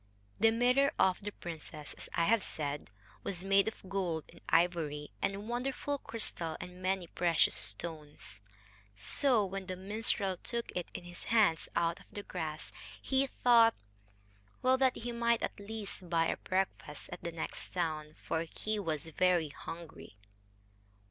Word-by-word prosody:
The 225 Hz, -, +7 dB
mirror 250 Hz, +5 st, +4 dB
of 185 Hz, -1 st, +4 dB
the 205 Hz, +1 st, -3 dB
princess, 160 Hz, -4 st, -7 dB
as -, -, -6 dB
I 170 Hz, -, +3 dB
have 225 Hz, +3 st, +4 dB
said, 145 Hz, -, -3 dB, 0.3 s
was 180 Hz, -2 st, -3 dB
made 195 Hz, +1 st, +5 dB
of 220 Hz, -3 st, -5 dB
gold 180 Hz, -5 st, -1 dB
and 170 Hz, -, -15 dB
ivory, 160 Hz, -4 st, +2 dB
and 200 Hz, +2 st, -1 dB
wonderful 270 Hz, +4 st, -1 dB
crystal 170 Hz, -10 st, -3 dB
and 180 Hz, 0 st, -8 dB
many 185 Hz, -1 st, +1 dB
precious 170 Hz, -1 st, +3 dB
stones. 150 Hz, -, -3 dB, 0.5 s
So, 230 Hz, -, +3 dB
when 195 Hz, 0 st, -4 dB
the 185 Hz, -, -2 dB
minstrel 195 Hz, 0 st, 0 dB
took 235 Hz, +5 st, -3 dB
it 180 Hz, -1 st, -1 dB
in -, -, -5 dB
his 175 Hz, 0 st, -9 dB
hands 210 Hz, -8 st, +4 dB
out 170 Hz, 0 st, +2 dB
of -, -, -17 dB
the 205 Hz, -, -6 dB
grass, 155 Hz, -4 st, -4 dB, 0.3 s
he 270 Hz, +1 st, +2 dB
thought 235 Hz, -3 st, +6 dB, 0.9 s
well, 260 Hz, +1 st, +5 dB
that 260 Hz, -1 st, +4 dB
he 240 Hz, +1 st, -3 dB
might 235 Hz, -1 st, +2 dB
at -, -, -2 dB
least 200 Hz, -3 st, -6 dB
buy 165 Hz, -1 st, +3 dB
a -, -, 0 dB
breakfast 185 Hz, -5 st, -2 dB
at -, -, -7 dB
the 170 Hz, -, -3 dB
next 165 Hz, -1 st, -5 dB
town. 155 Hz, -3 st, -2 dB
For 160 Hz, -, 0 dB
he 210 Hz, +6 st, -2 dB
was 160 Hz, -4 st, -2 dB
very 175 Hz, -1 st, +3 dB
hungry. 165 Hz, -7 st, -9 dB
185 Hz, 155 wpm, -33 LUFS, 165-220 Hz, 0.9 s, The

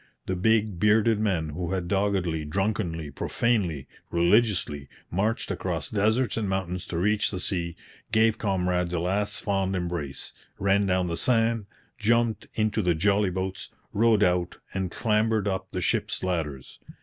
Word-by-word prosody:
The 95 Hz, -, -1 dB
big, 105 Hz, 0 st, +2 dB
bearded 105 Hz, +2 st, +4 dB
men, 95 Hz, -8 st, 0 dB
who 85 Hz, +4 st, -3 dB
had 90 Hz, -2 st, -2 dB
doggedly, 95 Hz, -5 st, 0 dB
drunkenly, 85 Hz, -2 st, -2 dB
profanely, 90 Hz, -, 0 dB, 0.2 s
religiously, 85 Hz, -5 st, +2 dB, 0.2 s
marched 105 Hz, +6 st, 0 dB
across -, -, -3 dB
deserts 110 Hz, +4 st, +1 dB
and 105 Hz, -3 st, -1 dB
mountains 90 Hz, -2 st, -2 dB
to 85 Hz, -, -3 dB
reach 105 Hz, +3 st, +2 dB
the 95 Hz, -, -4 dB
sea, 85 Hz, -2 st, -2 dB, 0.4 s
gave 110 Hz, 0 st, +3 dB
comrades 90 Hz, -4 st, 0 dB
a -, -, 0 dB
last 95 Hz, +4 st, -1 dB
fond 95 Hz, -1 st, 0 dB
embrace, 85 Hz, -6 st, -4 dB, 0.2 s
ran 100 Hz, +1 st, +2 dB
down 90 Hz, -1 st, +2 dB
the 85 Hz, -1 st, -2 dB
sand, 115 Hz, -3 st, +1 dB, 0.3 s
jumped 115 Hz, +1 st, +1 dB
into 110 Hz, 0 st, +1 dB
the 90 Hz, -3 st, +2 dB
jolly 100 Hz, +4 st, +2 dB
boats, 95 Hz, +1 st, -4 dB, 0.2 s
rowed 110 Hz, -1 st, +4 dB
out, 90 Hz, -1 st, +1 dB, 0.2 s
and 95 Hz, -2 st, -1 dB
clambered 110 Hz, 0 st, +1 dB
up 95 Hz, -1 st, -2 dB
the 90 Hz, -, -3 dB
ships' -, -, 0 dB
ladders. 80 Hz, -8 st, -3 dB
95 Hz, 150 wpm, -26 LUFS, 90-105 Hz, 0.4 s, bearded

